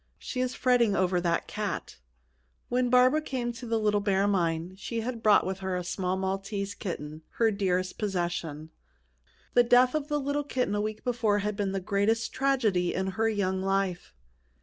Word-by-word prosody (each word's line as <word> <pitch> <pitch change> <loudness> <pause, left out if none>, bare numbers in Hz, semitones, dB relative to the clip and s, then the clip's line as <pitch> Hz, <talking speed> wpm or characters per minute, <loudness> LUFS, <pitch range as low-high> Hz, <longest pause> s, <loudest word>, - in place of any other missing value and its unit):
"She 255 - -4
is 255 0 -1
fretting 240 -5 +3
over 180 -1 +1
that 170 -1 0
cat." 210 -1 -4 0.7
When 250 0 +1
Barbara 255 +5 +5
came 255 -5 -3
to 235 +1 -8
the 230 0 +1
Little 210 -1 +2
Bear 200 -1 +1
Mine, 170 -3 0
she 225 +4 -4
had 235 0 -4
brought 215 -2 +5
with 190 +1 -3
her 190 -1 -2
a 180 - -2
small 185 +1 -2
Maltese 195 +1 -3
kitten, 155 -6 -6
her 225 -1 +2
dearest 185 -2 -1
possession. 175 -6 -3 0.8
The 245 - +6
death 245 +1 +5
of 305 -2 -1
the 295 -1 0
little 285 +1 -1
kitten 255 -6 -1
a 205 - 0
week 215 0 -4
before 230 -4 +1
had 210 0 -1
been 200 -1 -1
the 195 - -1
greatest 210 +4 0
tragedy 225 -10 +1
in 190 +1 -1
her 225 +4 +1
young 190 -3 -1
life. 195 - -1
205 Hz, 180 wpm, -28 LUFS, 185-240 Hz, 0.8 s, The